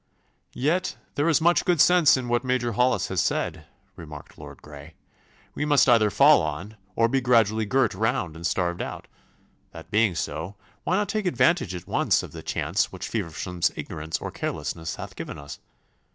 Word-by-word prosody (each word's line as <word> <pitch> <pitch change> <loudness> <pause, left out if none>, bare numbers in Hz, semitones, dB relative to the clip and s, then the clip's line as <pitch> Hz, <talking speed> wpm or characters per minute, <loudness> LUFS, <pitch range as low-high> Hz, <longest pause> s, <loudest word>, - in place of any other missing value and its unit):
'Yet 170 +8 0 0.2
there 145 +3 +1
is 160 - +4
much 170 +2 +3
good 175 -4 +1
sense 175 -3 +6
in 125 -2 -4
what 120 0 0
Major 125 -2 0
Hollis 125 +4 +1
has 95 -3 0
said,' - - -2 0.3
remarked 75 -3 -11
Lord - - -11
Grey. 75 +1 -12 0.6
'We 150 - -2
must 145 -2 +4
either 115 -4 +5
fall 140 +9 +6
on, 85 +8 -5 0.2
or 115 - +3
be 135 +3 0
gradually 110 -3 +2
girt 130 0 +2
round 95 -5 -1
and 85 +1 -3
starved 85 -1 -1
out. - - -6 0.7
That - - -12
being 105 -4 +2
so, 85 +4 -4 0.3
why 185 - +1
not 205 +1 0
take 215 -3 -2
advantage 165 - +2
at 90 - -8
once - - +1
of - - -9
the - - -9
chance - - -1
which - - -7
Feversham's 85 +2 -2
ignorance 80 +1 -5
or - - -6
carelessness 80 -1 -4
hath - - -9
given - - -7
us? 70 0 -9
110 Hz, 180 wpm, -25 LUFS, 85-140 Hz, 0.7 s, sense